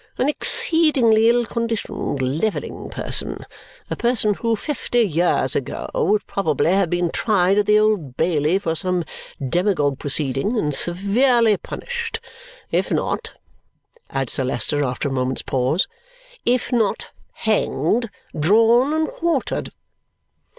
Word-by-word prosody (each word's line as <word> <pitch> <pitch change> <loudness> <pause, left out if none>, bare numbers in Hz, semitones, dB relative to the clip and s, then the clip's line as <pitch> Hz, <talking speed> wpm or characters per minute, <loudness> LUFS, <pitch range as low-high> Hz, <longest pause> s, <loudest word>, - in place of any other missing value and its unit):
An 255 - +1
exceedingly 300 - +3
ill 240 0 +3
conditioned, 225 - -3
levelling 155 +12 -2
person. - - -4 0.5
A - - 0
person 235 -3 +1
who, 230 +2 0
fifty 245 -1 -1
years 175 -3 +1
ago, - - -3
would 335 - +1
probably 160 -4 0
have 190 -2 +2
been 175 -1 0
tried 195 -2 +2
at 205 - 0
the 210 0 +5
Old 210 -12 +1
Bailey 160 +1 +2
for 195 -5 -2
some 180 +1 -1 0.4
demagogue 150 -4 +1
proceeding, 145 - -1
and 150 -8 0
severely 215 - +2
punished 470 - -5 0.5
if - - +1
not," - - -2 0.8
adds 135 -3 -2
Sir 135 - +1
Leicester 145 +3 0
after 130 +1 -2
a - - -3
moment's 130 0 -1
pause, 130 +7 +1 0.6
"if 250 +1 +1
not 225 -5 0 0.2
hanged, 220 - 0 0.3
drawn, 225 - +4
and 315 0 +1
quartered." 330 -5 -2
205 Hz, 125 wpm, -21 LUFS, 155-235 Hz, 0.8 s, the